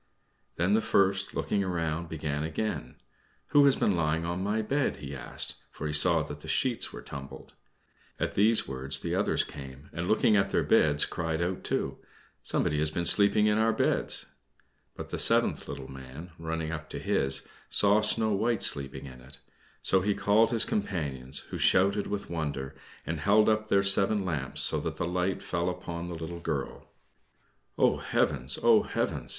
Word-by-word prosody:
Then 90 +4 +1
the 110 - +3
first, 100 -2 +1
looking 100 - 0
round, 85 -2 -2
began 75 -2 -3
again, 80 - -4 0.5
"Who 145 -1 +5
has 140 - +5
been 100 - +1
lying 80 0 0
on 85 +2 -3
my 105 +2 0
bed?" 140 +6 0
he 70 -1 -7
asked, - - -3
for 75 - -8
he 75 - -2
saw 80 +1 +3
that 75 -1 -8
the 80 - -12
sheets 120 +8 0
were - - -9
tumbled. 70 -1 -10 0.7
At - - -2
these 110 +3 +4
words 65 +1 -3
the - - -3
others - - +1
came, 70 0 -11
and 85 +1 -3
looking 110 +1 +3
at 100 -1 +2
their - - +1
beds 75 -1 +3
cried 80 -1 -3
out 90 +2 -2
too, - - -2 0.4
"Some - - -1
one - - 0
has 75 +1 +2
been 85 +3 -3 0.3
lying 105 -1 +2
in 105 0 +2
our 110 0 +3
beds!" - - 0 0.7
But - - -8
the - - -4
seventh - - +3
little 65 - -7
man, 65 +6 -10
running 80 -1 -3
up 75 -1 -7
to - - -6
his, 65 0 0 0.2
saw 105 +1 +5
Snow 110 0 +2
White 110 +2 0
sleeping 70 0 +1
in 65 -2 -11
it; 65 +2 -15 0.4
so 95 - +3
he 100 +2 0
called 110 +2 +3
his 115 -2 +1
companions, 75 - -3
who - - -4
shouted 100 +2 +3
with 105 -1 -4
wonder 75 -5 -4 0.3
and 85 -1 -3
held 105 +6 +4
up 110 0 +1
their 100 -2 +3
seven 100 +1 +3
lamps, 75 -7 -1
so - - +3
that - - -4
the - - -2
light 90 +1 -1
fell 85 0 -1
upon 85 -1 -6
the 85 - -6
little 80 +1 -6
girl. 75 -5 -4 0.9
"Oh, - - +3
heavens! 65 +2 -1
oh, - - +6
heavens!" - - -3
85 Hz, 180 wpm, -28 LUFS, 75-100 Hz, 0.9 s, oh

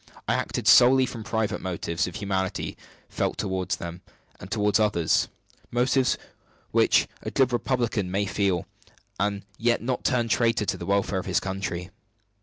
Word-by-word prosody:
I - - +2
acted - - -2
solely 130 +2 +7
from 115 -3 -7
private 110 -1 -1
motives 85 -3 -2
of - - -7
humanity 95 -3 -2 0.6
toward 95 -1 -2
them 85 0 -4 0.4
and 90 - -10
toward 105 -1 +2
others 100 -7 +2 0.4
motives 125 +2 +2 0.5
which - - +4
a - - -4
good 130 -2 +2
republican 120 -6 0
may 100 +2 0
feel, 95 -3 0 0.5
and 100 0 -1
yet 120 0 +2
not 125 0 -2
turn 120 -3 +1
traitor 115 -2 +2
to - - -1
the - - -7
welfare 100 -1 +1
of 95 - -7
his 90 - +2
country." 95 -2 -4
100 Hz, 150 wpm, -26 LUFS, 95-115 Hz, 0.6 s, solely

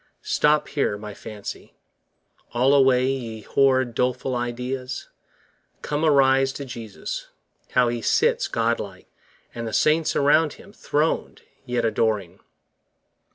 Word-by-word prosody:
Stop 150 0 +2
here, 140 -8 0
my 105 0 -8
fancy: 105 0 -9 0.8
(all 130 +3 +4
away, 130 -2 +5
ye 120 -5 -3
horrid 130 +1 +2
Doleful 125 +2 -1
ideas!) 125 +2 -4 0.7
come, 150 +1 -2
arise 135 -3 +4
to 140 - -6
Jesus, 115 -5 -6 0.4
30 - - -26
How 125 -1 +4
He 120 0 -3
sits - - +2
God 115 +1 0
like! 95 -3 -8 0.5
and 115 -1 -5
the 110 - -5
saints 155 +1 +2
around 150 +2 +3
Him 200 - -15
Throned, 155 -5 -1 0.2
yet 120 -1 0
adoring! 110 -5 0
125 Hz, 125 wpm, -24 LUFS, 115-140 Hz, 0.8 s, away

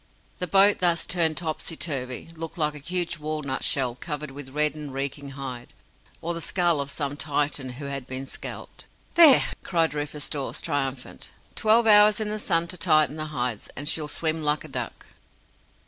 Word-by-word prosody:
The 180 - 0
boat, 200 +2 +5
thus 170 -2 +2
turned 165 -3 +3
topsy 160 -1 -2
turvy, 135 -2 -2
looked 165 +1 -7
like 150 -2 +1
a 150 - -8
huge 170 +2 -2
walnut 150 -3 -3
shell 130 -4 +2
covered 150 +3 -6
with 135 -1 -8
red 150 +2 +1
and 150 -2 -7
reeking 140 +1 -4
hide, 125 -3 -7 0.5
or 170 +1 -1
the 165 - -4
skull 170 -2 +2
of 140 - -4
some 145 0 -3
Titan 145 -3 -1
who 140 +3 -8
had 140 -2 -5
been 130 +1 -5
scalped. - - -8 0.3
"There!" 320 -6 +8 0.2
cried 165 -3 0
Rufus 145 0 -4
Dawes, 140 -3 -4
triumphant. 135 -2 -4 0.2
"Twelve 225 +2 +4
hours 210 0 +6
in 215 -1 -2
the 215 0 -3
sun 170 -4 +1
to 180 - -2
tighten 155 -2 +3
the 155 - -3
hides, 125 -7 -3
and 145 +2 -5
she'll 155 -1 +1
swim 160 +1 0
like 150 0 0
a - - -7
duck." - - -4
150 Hz, 180 wpm, -25 LUFS, 140-170 Hz, 0.5 s, There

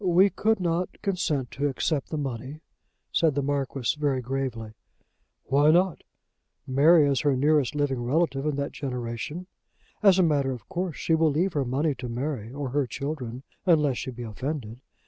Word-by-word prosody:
"We 185 +2 +5
could 220 0 +1
not 175 0 -1
consent 165 - -1
to 145 +1 -1
accept 145 +2 -1
the 155 - -3
money," 135 +2 -5 0.5
said 160 -4 +2
the 140 - 0
Marquis 135 -2 -1
very 140 -3 +1
gravely. 125 -3 -3 0.7
"Why 145 +2 +3
not? 180 +1 +3 0.6
Mary 145 +4 +5
is 140 -2 +2
her 145 -2 +2
nearest 145 0 +2
living 140 -4 0
relative 140 +1 0
in 150 - 0
that 140 0 -2
generation. 125 +5 -5 0.6
As 195 -3 +6
a 185 - +5
matter 140 -5 +2
of 125 - -10
course, 180 -3 -3
she 165 - 0
will 160 0 +4
leave 170 +6 0
her 140 -3 0
money 140 +5 0
to 125 -1 -5
Mary 120 -2 -3
or 140 0 -4
her 140 0 0
children, 130 -1 -5 0.2
unless 150 -7 +4
she 130 - -4
be 120 -1 -7
offended. 120 +1 -5
145 Hz, 170 wpm, -26 LUFS, 130-160 Hz, 0.7 s, As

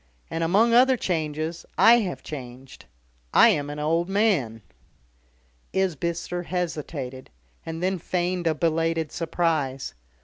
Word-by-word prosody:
"And, 165 0 -1
among 210 +8 +3
other 255 +2 +5
changes, 160 -2 -2
I 235 +1 +7
have 190 -6 -4
changed. 130 -2 -9 0.5
I - - +8
am 145 0 0
an 145 - -6
old 165 +4 0
man." 175 - +1 1.1
Isbister 175 -1 -1
hesitated, 155 -7 -4 0.4
and 165 +1 -5
then 190 0 0
feigned 175 0 -1
a 160 - +2
belated 165 -1 0
surprise. 160 -6 -1
165 Hz, 115 wpm, -25 LUFS, 150-180 Hz, 1.1 s, I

